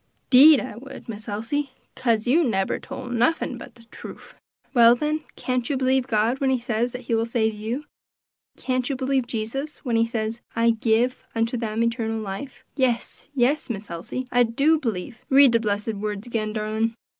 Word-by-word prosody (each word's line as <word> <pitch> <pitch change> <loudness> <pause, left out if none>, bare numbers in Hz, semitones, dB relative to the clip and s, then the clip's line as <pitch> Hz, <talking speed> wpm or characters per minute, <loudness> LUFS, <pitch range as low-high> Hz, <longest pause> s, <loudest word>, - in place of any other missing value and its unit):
"'Deed 285 +3 +9
I 240 -5 -6
would, 270 +3 -11
Miss 220 0 -7
Elsie, 230 +8 -2 0.3
kase 230 -3 +1
you 300 +8 +4
nebber 195 -8 0
tole 270 -1 -8
nuffin 245 +6 0
but - - -11
de 235 - -16
truff." - - -11 0.4
"Well, 235 -2 +7
then, 305 +4 -2
can't 250 -2 -2
you 280 - 0
believe 260 0 +1
God 230 +2 +1
when 270 - +1
he 260 - +2
says 240 0 -1
that 250 - -7
he 235 -1 -3
will 225 0 +1
save 220 -2 0
you? 225 +7 -4 0.7
Can't 255 0 -1
you 275 - -1
believe 260 -1 0
Jesus 270 +8 -4
when 235 -3 +1
he 230 0 +3
says, 225 0 -3
'I 230 0 +4
give 230 +2 +1
unto 230 +2 0
them 225 -1 -1
eternal 230 -1 -1
life'?" 215 +6 -7
"Yes, 255 -4 -1
yes, 275 +4 +1
Miss 210 -4 -5
Elsie! 175 +10 -5
I 245 - +4
do 280 +7 +3
b'lieve; 230 -2 -4
read 275 -1 +7
de 230 - +3
blessed 210 0 -1
words 210 0 -4
again, 220 -3 -2
darlin'." 220 +1 -1
235 Hz, 185 wpm, -24 LUFS, 220-260 Hz, 0.7 s, Deed